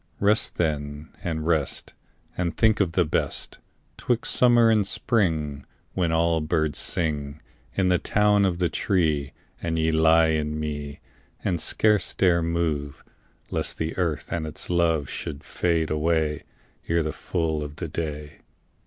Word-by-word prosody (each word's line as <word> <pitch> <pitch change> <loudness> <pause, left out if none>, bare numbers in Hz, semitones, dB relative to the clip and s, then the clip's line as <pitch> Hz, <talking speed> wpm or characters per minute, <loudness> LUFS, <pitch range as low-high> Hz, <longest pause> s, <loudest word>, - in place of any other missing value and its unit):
Rest 105 +2 +3
then 75 -2 -3
and 80 -3 -3
rest, 80 -5 0 0.4
And 85 -2 -2
think 110 -1 +3
of 90 -5 +1
the 90 0 +3
best 75 - -2 0.4
'Twixt 120 -1 0
summer 120 -2 +5
and 105 -3 +2
spring, 80 - 0 0.3
When 90 -3 0
all 80 0 +2
birds 80 -1 0
sing 75 -3 -1 0.4
In 95 -2 +2
the 90 -1 +3
town 105 0 +3
of 95 -3 +1
the 90 -1 +1
tree, 80 -8 0 0.3
And 80 -1 -2
ye 80 0 +2
lie 80 +1 +4
in 75 -1 -1
me 75 -2 -5 0.4
And 85 -3 0
scarce 105 -3 +3
dare 90 -3 +3
move, 80 -4 -2 0.5
Lest - - -1
the 80 0 -3
earth 85 -4 -2
and 80 -2 -2
its 75 - -5
love 80 -4 +2
Should 70 - -5
fade 80 -3 -1
away 75 -1 0 0.4
Ere 85 0 +1
the 75 -1 -3
full 80 -4 -2
of 75 0 -6
the 85 0 -5
day. 75 -2 -5
80 Hz, 150 wpm, -25 LUFS, 75-90 Hz, 0.5 s, summer